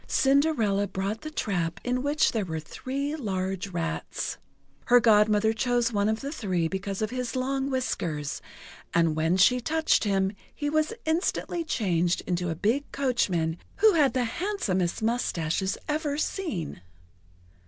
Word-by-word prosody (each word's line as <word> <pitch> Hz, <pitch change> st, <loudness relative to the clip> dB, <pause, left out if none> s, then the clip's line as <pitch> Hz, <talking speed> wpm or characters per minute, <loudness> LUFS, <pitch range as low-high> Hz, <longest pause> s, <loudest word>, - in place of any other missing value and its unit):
Cinderella 265 Hz, -8 st, +2 dB
brought 195 Hz, +3 st, -3 dB
the 310 Hz, -, -5 dB
trap 175 Hz, -, -2 dB
in 250 Hz, 0 st, 0 dB
which 290 Hz, +3 st, +2 dB
were 185 Hz, -8 st, -2 dB
three 275 Hz, -, -4 dB
large 190 Hz, -, -2 dB
rats. 170 Hz, -3 st, -3 dB, 0.5 s
Her 245 Hz, -1 st, +6 dB
Godmother 215 Hz, -1 st, +4 dB
chose 240 Hz, +1 st, +1 dB
one 205 Hz, 0 st, +2 dB
of 220 Hz, 0 st, -1 dB
the 280 Hz, -, -4 dB
three 185 Hz, -, -1 dB
because 195 Hz, +3 st, -3 dB
of 215 Hz, -, -2 dB
his 250 Hz, -1 st, -3 dB
long 270 Hz, +1 st, -1 dB
whiskers; 170 Hz, -, -2 dB, 0.5 s
and 165 Hz, -2 st, +3 dB
when 160 Hz, +3 st, +2 dB
she 250 Hz, +7 st, +5 dB
touched 320 Hz, +5 st, +2 dB
him, 195 Hz, -2 st, +1 dB, 0.2 s
he 290 Hz, 0 st, -2 dB
was 310 Hz, 0 st, +2 dB
instantly 335 Hz, +1 st, 0 dB
changed 180 Hz, -, 0 dB
into 180 Hz, -1 st, -1 dB
a 165 Hz, -, -2 dB
big 230 Hz, -, 0 dB
coachman 180 Hz, -12 st, 0 dB, 0.2 s
who 435 Hz, -1 st, +5 dB
had 295 Hz, -5 st, +4 dB
the 255 Hz, -, +2 dB
handsomest 225 Hz, -, -1 dB
moustaches 190 Hz, -6 st, 0 dB
ever 300 Hz, -1 st, -1 dB
seen. 295 Hz, -, -3 dB
220 Hz, 145 wpm, -27 LUFS, 185-275 Hz, 0.5 s, Her